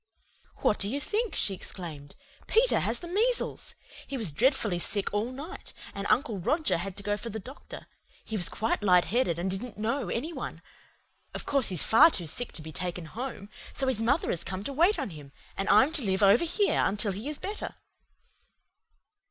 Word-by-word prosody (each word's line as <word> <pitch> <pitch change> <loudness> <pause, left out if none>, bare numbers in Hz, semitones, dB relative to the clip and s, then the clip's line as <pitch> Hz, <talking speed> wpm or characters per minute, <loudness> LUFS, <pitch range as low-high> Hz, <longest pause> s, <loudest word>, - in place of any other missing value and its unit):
"What 210 - +3
do 200 - +2
you 275 +5 -1
think?" 430 +9 -1
she 200 - 0
exclaimed. 160 -6 -6 0.3
"Peter 480 +3 +4
has - - 0
the 345 - -7
measles! 450 +8 0 0.3
He 275 - -4
was 215 -10 +1
dreadfully 220 - +2
sick 200 +3 -1
all 215 +4 0
night, 285 +7 -8 0.2
and 200 0 -4
Uncle 235 -7 +2
Roger 300 - +1
had 190 +2 -5
to 200 - -6
go 205 +1 0
for 220 +3 -6
the 220 - -5
doctor. 260 +7 -10 0.4
He 220 - -4
was 180 -5 +1
quite 220 +1 -1
light 180 -3 +5
headed, 225 -7 +1
and 185 +2 -1
didn't 210 +5 -5
know 225 0 -1
any 295 - -2
one. - - -6 0.7
Of - - -4
course 275 -5 +4
he's 180 -5 +3
far 285 +9 +7
too 180 - 0
sick 245 +10 -2
to 155 - -7
be 160 - -8
taken 180 -1 -4
home, 210 - -6 0.2
so 270 - -1
his 255 -4 +1
mother 275 +8 +2
has 170 - -2
come 185 +1 -4
up - - -11
to 280 - -3
wait 345 +9 +4
on 270 - -3
him, 145 -3 -11 0.2
and 195 - -2
I'm 260 +9 +6
to 320 - +1
live 195 -2 +1
over 200 +11 +6
here 395 +5 +2
until 205 +1 +1
he 210 +9 -5
is 300 - -3
better." 415 +2 -5
220 Hz, 200 wpm, -28 LUFS, 190-280 Hz, 0.7 s, far